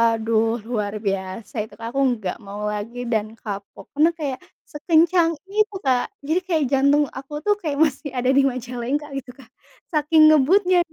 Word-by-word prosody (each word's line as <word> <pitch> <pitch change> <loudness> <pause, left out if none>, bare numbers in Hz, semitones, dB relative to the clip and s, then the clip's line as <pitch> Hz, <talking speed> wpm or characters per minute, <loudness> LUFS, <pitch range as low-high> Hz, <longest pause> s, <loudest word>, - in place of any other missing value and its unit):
aduh, 225 +1 0
luar 210 -3 -3
biasa 195 0 -4
itu, 220 - -18
Kak, 230 0 -7
aku 270 - -6
enggak 220 -8 -1
mau 205 0 -8
lagi 230 +4 -5
dan 215 -1 -1
kapok, 200 -3 -8
karena 315 +3 +5
kayak 285 -6 -4 0.3
sekencang 330 +2 +3 0.2
itu, 425 0 0
Kak. 255 -3 +2 0.2
Jadi 315 +5 +1
kayak 325 -5 +1
jantung 280 +2 +4
aku 270 +2 -9
tuh 415 - +3
kayak 300 -4 -2
masih 290 -1 -1
ada 250 +1 +1
di 275 - +5
Majalengka 255 +3 -3
gitu, 250 -2 -7
Kak. 260 -4 -17 0.4
Saking 310 0 +5
ngebutnya, 360 +6 +4
265 Hz, 165 wpm, -22 LUFS, 225-310 Hz, 0.4 s, karena